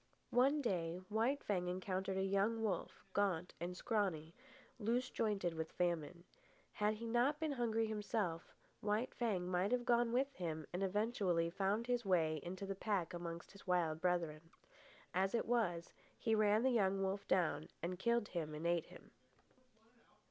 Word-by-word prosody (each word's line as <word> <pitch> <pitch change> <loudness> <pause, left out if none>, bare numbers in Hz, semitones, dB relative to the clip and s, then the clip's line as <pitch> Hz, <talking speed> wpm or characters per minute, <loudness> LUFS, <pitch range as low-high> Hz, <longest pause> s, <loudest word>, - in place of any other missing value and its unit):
One 275 +4 +4
day 175 -6 -1
While 225 +6 +2
Fang 190 -10 -2
encountered 185 +1 -2
a 190 - +1
young 200 +4 +1
wolf, 195 -6 -2
gaunt 185 -4 +1
and 175 +2 -4
scrawny, 185 -9 -1 0.5
loose 240 +4 0
jointed 200 -6 0
with 160 0 -4
famine. 170 -1 -1 0.5
Had 210 +1 +1
he 230 +2 -6
not 245 +6 +2
been 315 -2 0
hungry 230 -4 +1
himself, 210 -5 -2 0.3
White 210 +4 0
Fang 205 -7 0
might 180 +3 +1
have 245 -1 +1
gone 240 -1 +3
with 270 +3 +1
him 160 -3 -4
and 180 - -2
eventually 195 -4 +1
found 200 +5 0
his 245 -1 0
way 165 -5 +2
into 185 +3 -5
the 195 - -2
pack 195 -4 -1
amongst 170 -1 -6
his 200 -1 -15
wild 165 -3 +1
brethren. 170 -4 0 0.7
As 190 +4 +2
it 230 - +1
was, 190 -8 0 0.2
he 225 - +1
ran 215 +1 +4
the 260 - +4
young 195 -4 +2
wolf 195 +1 -2
down 165 -4 +1
and 180 +1 -2
killed 235 0 +2
and 155 -2 -3
ate 170 -1 +1
him. - - -14
195 Hz, 160 wpm, -39 LUFS, 175-225 Hz, 0.7 s, One